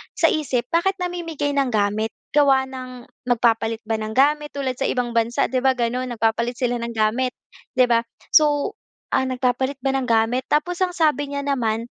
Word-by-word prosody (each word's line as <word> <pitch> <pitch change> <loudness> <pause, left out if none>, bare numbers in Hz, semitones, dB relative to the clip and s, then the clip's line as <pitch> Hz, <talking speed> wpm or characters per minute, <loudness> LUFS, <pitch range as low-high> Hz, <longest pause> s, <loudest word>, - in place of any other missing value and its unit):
sa 330 - +3
isip, 255 -6 -1
bakit 370 +4 +2
namimigay 330 -5 -3
ng 275 -1 +2
gamit? 215 +1 0 0.2
Gawa 275 -2 +5
ng 255 -2 -9 0.2
magpapalit 230 -2 +1
ba 220 -1 -1
ng 215 0 -5
gamit? 295 +2 +2
Tulad 260 -3 -3
sa 270 - +1
ibang 245 -1 -1
bansa, 230 +1 +1
'di 255 - +1
ba 265 0 +2
gano'n, 250 +1 -1
nagpapalit 230 +2 0
sila 245 -1 0
ng 235 0 -5
gamit, 235 +4 +1 0.4
'di 255 - +5
ba. 235 -1 +4 0.3
So, 295 -2 +3 0.4
ah, 265 - +1
nagpapalit 260 +1 0
ba 270 - +2
ng 260 -1 -1
gamit? 230 +3 +1
Tapos 305 +4 0
ang 360 -1 0
sabi 300 -3 +2
niya 280 0 -3
naman, 230 -5 0
255 Hz, 180 wpm, -22 LUFS, 235-285 Hz, 0.4 s, Gawa